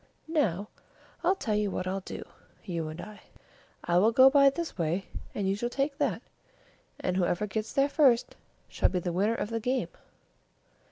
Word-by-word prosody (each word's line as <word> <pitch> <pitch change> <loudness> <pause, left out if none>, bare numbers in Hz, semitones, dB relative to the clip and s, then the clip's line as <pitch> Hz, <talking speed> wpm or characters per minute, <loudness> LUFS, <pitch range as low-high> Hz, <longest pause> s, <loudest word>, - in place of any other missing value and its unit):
Now, 215 - 0 0.5
I'll 375 - +3
tell 235 - -2
you 210 -1 +1
what 185 - -3
we'll 190 +1 -2
do, 190 - -7 0.4
you 170 -5 -3
and 155 +2 -7
I: 210 +3 -9 0.6
I 175 0 +3
will 215 +4 +4
go 260 +3 +7
by 280 -1 +7
this 325 +4 -5
way, 170 +2 -1 0.3
and 200 -2 -1
you 195 - +1
shall 240 +4 -2
take 280 +3 -2
that, - - 0 0.8
and 180 - -1
whoever 180 +2 +1
gets 215 +2 -3
there 275 0 +3
first 275 -5 +3 0.3
shall - - +1
be 185 - -2
the 175 -1 -2
winner 205 +6 +1
of 220 - -3
the 230 - -1
game." 250 +3 -1
210 Hz, 180 wpm, -29 LUFS, 185-265 Hz, 0.8 s, go